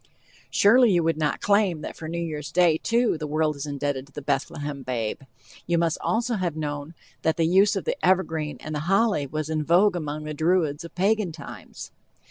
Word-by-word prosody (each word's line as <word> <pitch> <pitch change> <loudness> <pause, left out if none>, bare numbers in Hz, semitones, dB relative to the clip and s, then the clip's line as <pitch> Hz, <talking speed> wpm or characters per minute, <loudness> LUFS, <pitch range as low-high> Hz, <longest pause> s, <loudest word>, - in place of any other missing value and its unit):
Surely 235 +3 +5
you 175 -2 +3
would 165 -1 0
not 150 -2 -1
claim 200 -6 +2
that - - -6
for 160 - -8
New 170 +2 -4
Year's 155 -3 -4
day, 170 -3 +3
too, 235 -7 +1
the 155 - -4
world 155 0 0
is 140 +1 -6
indebted 140 -1 -3
to - - -21
the 145 - -8
Bethlehem 145 0 -2
babe. 120 -4 -3 0.5
You 170 0 +2
must 165 -1 +1
also 235 0 0
have 175 -5 -2
known 145 +1 -5 0.3
that 160 - +1
the 165 - +2
use 195 +5 +4
of 195 - -3
the - - -3
evergreen 165 -5 +1
and 155 - -6
the 150 - -2
holy 195 -7 +2
was 155 +2 -3
in 155 -1 -1
vogue 180 +5 +4
among 155 -2 -4
the 155 0 -5
Druids 160 -1 +1
of 170 - -11
Pagan 200 0 +1
times. 140 -8 -10
160 Hz, 205 wpm, -25 LUFS, 150-185 Hz, 0.5 s, Surely